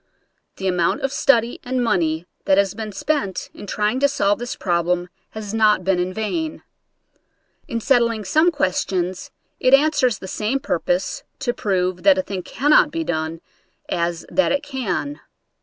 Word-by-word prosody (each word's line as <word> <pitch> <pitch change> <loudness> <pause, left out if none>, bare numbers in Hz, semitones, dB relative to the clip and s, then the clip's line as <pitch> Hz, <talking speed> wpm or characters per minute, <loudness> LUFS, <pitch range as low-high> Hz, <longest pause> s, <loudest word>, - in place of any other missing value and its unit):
The 190 - -3
amount 180 -2 +1
of 270 - -1
study 240 -4 +2
and 255 0 -1
money 165 -6 0 0.2
that 190 - +4
has 200 -2 +2
been 215 0 -5
spent 275 -4 -2
in 205 - -10
trying 210 +5 0
to 280 - +4
solve 205 -7 +1
this 240 0 -4
problem 175 0 0 0.3
has 210 -1 -5
not 215 -4 +3
been 190 -1 +1
in 180 +1 -1
vain. 310 - -3 1.0
In 230 - -2
settling 230 -3 +2
some 315 - +4
questions, 185 - -1 0.3
it 255 +1 +6
answers 280 -5 +2
the 190 - -9
same 215 +8 -1
purpose 180 - -1 0.2
to 245 -3 0
prove 185 -4 -1
that 290 -1 +5
a 280 - +1
thing 195 -7 -4
cannot 295 - +3
be 330 +2 -3
done 160 - -3 0.5
as 170 -1 -1
that 280 - +2
it 280 +1 0
can. 270 0 -3
215 Hz, 160 wpm, -21 LUFS, 180-275 Hz, 1.0 s, it